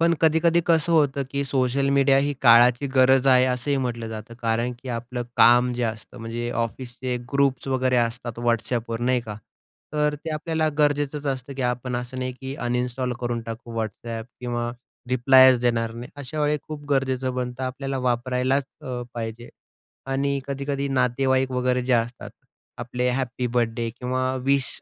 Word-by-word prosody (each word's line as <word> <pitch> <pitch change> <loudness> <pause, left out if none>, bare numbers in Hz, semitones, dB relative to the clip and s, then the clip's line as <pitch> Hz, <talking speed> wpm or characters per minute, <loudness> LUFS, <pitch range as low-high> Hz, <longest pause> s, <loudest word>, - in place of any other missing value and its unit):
पण 170 0 +4
कधीकधी 165 +1 +4
कसं 165 0 +3
होतं 140 -3 +3
की 140 0 -1
सोशल 135 0 +1
मीडिया 135 0 +5
ही 145 - 0
काळाची 120 +2 +6
गरज 130 0 +5
आहे 130 -1 +6
असंही 130 +3 0
म्हटलं 120 -3 -2
जातं 110 +2 -8
कारण 115 +2 0
की 130 - -8
आपलं 120 +1 -4
काम 120 +1 +6
जे 120 0 -3
असतं 110 +2 -5
म्हणजे 115 +1 -4
ऑफिसचे 125 +2 -4 0.2
ग्रुप्स 140 -2 +1
वगैरे 130 -1 +1
असतात 120 0 -1
WhatsApp 120 0 0
वर 115 0 -3
नाही 125 0 +2
का, 105 -3 -7 0.6
तर 150 0 +1
ते 160 +2 -7
आपल्याला 160 0 0
गरजेचंच 145 0 +1
असतं 135 0 -3
की 135 - -3
आपण 125 0 -3
असं 125 +1 -5
नाही 130 0 -2
की 135 +1 -5
अनइन्स्टॉल 125 +1 -1
करून 120 -1 -2
टाकू 115 +1 -8
WhatsApp 110 +1 -5 0.2
किंवा 120 -1 -2 0.4
रिप्लायच 130 0 +6
देणार 115 -2 0
नाही 120 +5 -8
अशा 145 +2 -5
वेळी 150 0 +2
खूप 150 -1 -8
गरजेचं 130 -1 0
बनतं 125 0 -4
आपल्याला 135 +1 -3
वापरायलाच 125 +2 0 0.2
अ, 125 -1 -5
पाहिजे 115 0 -5 0.6
आणि 140 +1 0
कधी-कधी 140 0 -2
नातेवाईक 130 0 +1
वगैरे 125 0 0
जे 130 - +1
असतात 120 +1 -1 0.5
आपले 125 +1 -2
हॅपी 125 -1 -2
बर्थडे 120 -1 0
किंवा 130 +2 -2
विश 140 0 +2
125 Hz, 160 wpm, -24 LUFS, 120-135 Hz, 0.6 s, काळाची